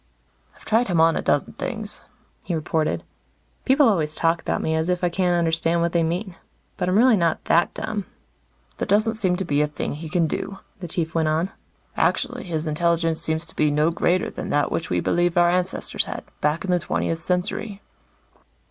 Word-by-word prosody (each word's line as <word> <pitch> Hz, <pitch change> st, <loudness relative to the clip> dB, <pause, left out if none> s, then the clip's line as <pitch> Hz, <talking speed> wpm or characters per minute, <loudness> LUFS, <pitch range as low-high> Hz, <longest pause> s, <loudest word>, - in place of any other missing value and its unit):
"I've -, -, -19 dB
tried 225 Hz, +3 st, +2 dB
him 175 Hz, -4 st, +1 dB
on 165 Hz, 0 st, +5 dB
a -, -, 0 dB
dozen 145 Hz, -, 0 dB
things," 220 Hz, -5 st, -5 dB, 0.4 s
he 175 Hz, -, -3 dB
reported. 155 Hz, 0 st, -1 dB, 0.6 s
People 275 Hz, +1 st, +5 dB
always 160 Hz, -8 st, +1 dB
talk 165 Hz, 0 st, +1 dB
about -, -, -1 dB
me 160 Hz, -, -1 dB
as 160 Hz, +2 st, 0 dB
if 180 Hz, 0 st, 0 dB
I 175 Hz, -, +3 dB
can't 175 Hz, 0 st, +1 dB
understand 165 Hz, 0 st, +1 dB
what 170 Hz, 0 st, +1 dB
they 170 Hz, -, +2 dB
mean. 175 Hz, +3 st, -2 dB, 0.4 s
But 180 Hz, -, -1 dB
I'm 185 Hz, -, +3 dB
really 245 Hz, +1 st, +6 dB
not 170 Hz, -3 st, 0 dB
that 170 Hz, +1 st, +2 dB
dumb. 210 Hz, -3 st, -3 dB, 0.7 s
"There -, -, -1 dB
doesn't 215 Hz, +3 st, +3 dB
seem 190 Hz, -5 st, 0 dB
to 190 Hz, +1 st, -3 dB
be 145 Hz, -2 st, +1 dB
a 150 Hz, -, +2 dB
thing 150 Hz, -, -4 dB
he 155 Hz, +2 st, -7 dB
can 170 Hz, 0 st, +2 dB
do," 195 Hz, +5 st, -3 dB, 0.2 s
the 180 Hz, -, -6 dB
Chief 160 Hz, -1 st, -2 dB
went 160 Hz, -1 st, +1 dB
on. 160 Hz, +5 st, 0 dB, 0.4 s
"Actually, 250 Hz, -1 st, 0 dB
his 160 Hz, -3 st, -3 dB
intelligence 165 Hz, +1 st, +1 dB
seems 160 Hz, +1 st, -1 dB
to 165 Hz, -, -9 dB
be 150 Hz, -, +3 dB
no 150 Hz, +3 st, +2 dB
greater 180 Hz, +1 st, +1 dB
than -, -, -6 dB
that 145 Hz, 0 st, +1 dB
which 165 Hz, -, -2 dB
we -, -, +1 dB
believe 175 Hz, 0 st, +1 dB
our 175 Hz, 0 st, +5 dB
ancestors 180 Hz, +1 st, -1 dB
had, -, -, -6 dB, 0.2 s
back 150 Hz, +5 st, 0 dB
in 185 Hz, -, -1 dB
the 180 Hz, -, +3 dB
twentieth 165 Hz, -1 st, -1 dB
century." 190 Hz, +4 st, -2 dB
170 Hz, 200 wpm, -23 LUFS, 160-185 Hz, 0.7 s, really